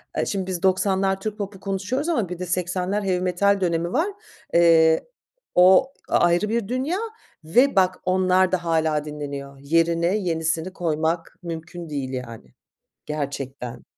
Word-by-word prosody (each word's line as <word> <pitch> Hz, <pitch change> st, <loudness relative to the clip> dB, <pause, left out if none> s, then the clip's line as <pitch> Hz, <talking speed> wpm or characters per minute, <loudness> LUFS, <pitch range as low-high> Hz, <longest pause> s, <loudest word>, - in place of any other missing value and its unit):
Aaa, -, -, 0 dB
şimdi 190 Hz, -2 st, -2 dB
biz 185 Hz, -1 st, -4 dB
90'lar 190 Hz, 0 st, +2 dB
Türk 215 Hz, 0 st, -4 dB
popu 200 Hz, -2 st, -6 dB
konuşuyoruz 205 Hz, -, -2 dB
ama 225 Hz, -, 0 dB
bir 180 Hz, -1 st, -6 dB
de 180 Hz, -, -3 dB
80'ler 180 Hz, +3 st, -1 dB
heavy 185 Hz, -2 st, 0 dB
metal 195 Hz, +2 st, +2 dB
dönemi 170 Hz, -1 st, 0 dB
var. 320 Hz, +8 st, +2 dB, 0.5 s
Eee, 165 Hz, -1 st, +5 dB, 0.5 s
o 190 Hz, +10 st, +6 dB, 0.2 s
a -, -, +3 dB
ayrı 175 Hz, +4 st, +2 dB
bir 225 Hz, -2 st, -1 dB
dünya 265 Hz, +9 st, -1 dB, 0.5 s
ve 245 Hz, -, +3 dB
bak 185 Hz, -1 st, +2 dB
onlar 185 Hz, 0 st, +3 dB
da 180 Hz, -2 st, 0 dB
hâlâ 160 Hz, -2 st, +1 dB
dinleniyor. 140 Hz, -2 st, -7 dB
Yerine 165 Hz, +5 st, +2 dB
yenisini 165 Hz, -1 st, -1 dB
koymak 165 Hz, 0 st, -1 dB
mümkün 170 Hz, 0 st, -7 dB
değil 135 Hz, -3 st, -4 dB
yani, 115 Hz, -, -7 dB, 0.5 s
gerçekten. 135 Hz, -4 st, -5 dB
180 Hz, 145 wpm, -23 LUFS, 160-195 Hz, 0.5 s, o